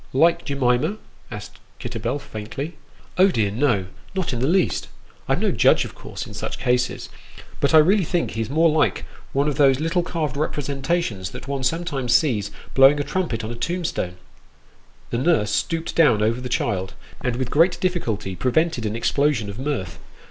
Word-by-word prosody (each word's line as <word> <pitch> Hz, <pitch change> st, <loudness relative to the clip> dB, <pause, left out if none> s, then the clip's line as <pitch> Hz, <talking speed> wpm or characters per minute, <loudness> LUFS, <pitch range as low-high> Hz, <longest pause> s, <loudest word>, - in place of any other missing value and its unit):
" -, -, -29 dB
Like 170 Hz, 0 st, +4 dB
Jemima? 135 Hz, +7 st, +1 dB, 0.2 s
" -, -, -30 dB
asked 105 Hz, -2 st, -9 dB, 0.2 s
Kitterbell, 120 Hz, +2 st, -3 dB
faintly. 135 Hz, +6 st, -6 dB, 0.2 s
" -, -, -27 dB
Oh, 190 Hz, -, +8 dB
dear 110 Hz, -, +1 dB
no; 115 Hz, -4 st, +1 dB, 0.3 s
not 185 Hz, -7 st, -1 dB
in 120 Hz, -, -2 dB
the 130 Hz, -, +1 dB
least. 180 Hz, +2 st, +1 dB, 0.4 s
I'm -, -, +2 dB
no -, -, +1 dB
judge, -, -, +4 dB
of -, -, -9 dB
course, -, -, -7 dB
in -, -, -10 dB
such -, -, -4 dB
cases; 125 Hz, 0 st, 0 dB, 0.5 s
but 140 Hz, +3 st, +3 dB
I -, -, +10 dB
really 185 Hz, +6 st, +5 dB
think 170 Hz, +1 st, -1 dB
he's 110 Hz, 0 st, -3 dB
more 160 Hz, +4 st, +4 dB
like 155 Hz, -, +1 dB, 0.3 s
one 140 Hz, +2 st, +1 dB
of 145 Hz, -3 st, -1 dB
those 135 Hz, -2 st, +5 dB
little 165 Hz, +3 st, +1 dB
carved 155 Hz, -5 st, -3 dB
representations 140 Hz, -, -1 dB
that -, -, -9 dB
one 140 Hz, -1 st, -2 dB
sometimes 135 Hz, -3 st, 0 dB
sees 110 Hz, -, +2 dB, 0.2 s
blowing 135 Hz, +2 st, +6 dB
a -, -, +1 dB
trumpet 145 Hz, -7 st, -2 dB
on 110 Hz, -, -4 dB
a -, -, -5 dB
tomb 170 Hz, +8 st, -2 dB
stone! 90 Hz, -11 st, -2 dB, 0.5 s
" -, -, -31 dB
The 115 Hz, -, 0 dB
nurse 130 Hz, -9 st, +2 dB
stooped 165 Hz, +7 st, -1 dB
down 135 Hz, -10 st, +4 dB
over 115 Hz, +3 st, +1 dB
the 125 Hz, -, -5 dB
child, 95 Hz, -5 st, -1 dB, 0.3 s
and 125 Hz, -2 st, 0 dB
with 125 Hz, -1 st, -3 dB
great 170 Hz, +4 st, +3 dB
difficulty 115 Hz, -, -2 dB
prevented 130 Hz, -, +1 dB
an 105 Hz, -, -3 dB
explosion 120 Hz, -3 st, +1 dB
of 100 Hz, -, -9 dB
mirth. 130 Hz, -, -3 dB
135 Hz, 190 wpm, -23 LUFS, 115-160 Hz, 0.5 s, I